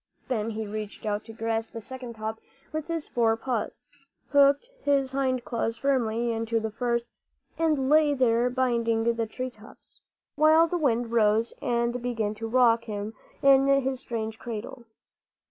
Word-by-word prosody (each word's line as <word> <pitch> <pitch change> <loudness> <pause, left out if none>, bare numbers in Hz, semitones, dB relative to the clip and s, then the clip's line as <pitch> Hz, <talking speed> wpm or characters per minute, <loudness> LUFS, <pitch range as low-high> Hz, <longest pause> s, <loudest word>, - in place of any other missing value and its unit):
Then 225 -3 -1
he 220 0 -4
reached 210 +1 -6
out 210 0 -1
to 225 - -9
grasp 225 0 -2
the 230 - -5
second 250 +1 -7
top 220 0 -4 0.3
with 310 -1 -4
his 330 -2 -3
fore 225 -2 +2
paws, 235 -2 -3 0.5
hooked 285 - +4
his 275 -2 +1
hind 260 -2 0
claws 230 -1 -2
firmly 240 -4 0
into 225 0 -1
the 220 0 -3
first, 235 +1 -2 0.5
and 305 -5 +2
lay 300 0 +4
there 245 -2 +3
binding 235 -3 +1
the 230 -1 0
tree 255 +3 -5
tops 220 -1 -17
together, - - -35 0.3
while 310 +2 +6
the 350 +1 -2
wind 240 -5 +1
rose 225 0 +2
and 235 0 0
began 225 -4 -1
to 225 +1 -5
rock 230 -1 +4
him 210 0 -5 0.3
in 275 0 +6
his 270 -1 +2
strange 225 -3 -4
cradle. 240 +2 -7
235 Hz, 165 wpm, -27 LUFS, 225-265 Hz, 0.5 s, while